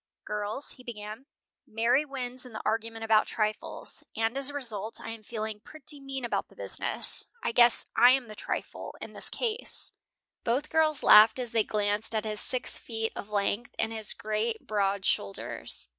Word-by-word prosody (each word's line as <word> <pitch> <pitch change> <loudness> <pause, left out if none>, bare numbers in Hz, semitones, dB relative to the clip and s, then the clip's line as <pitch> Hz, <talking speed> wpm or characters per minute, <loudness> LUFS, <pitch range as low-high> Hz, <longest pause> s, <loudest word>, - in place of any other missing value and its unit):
"Girls," 210 +6 -1
he 255 - -6
began, 220 +2 -8 0.4
"Mary 235 +6 +2
wins 255 -3 -4
in 250 -3 -11
the - - -5
argument 225 +1 -1
about 220 -1 +4
trifles, 215 -1 -2
and 225 +2 0
as 275 0 +5
a - - -7
result 225 -5 -1
I 225 - -6
am 225 -1 -8
feeling 215 -1 -5
pretty 295 +4 -4
mean 270 -2 -4
about 235 - -1
the - - -21
business. - - +1 0.2
I - - +1
guess 240 0 +6
I 245 +2 +8
am 260 -1 +3
the 215 - -8
trifle - - -5
in - - -8
the - - +1
case." 460 -1 -2 0.5
Both 260 +6 0
girls 310 -2 +2
laughed 215 +3 +8
as 245 -3 -2
they 225 -2 +3
glanced 210 +1 -1
at 215 0 0
his 215 -1 -2
six 255 -1 -2
feet 225 -1 -2
of 205 - -7
length, 205 +3 -1
and 225 0 0
his 220 -2 -2
great, 215 +1 -2
broad 200 -2 0
shoulders. 100 0 -2
225 Hz, 180 wpm, -29 LUFS, 215-255 Hz, 0.5 s, I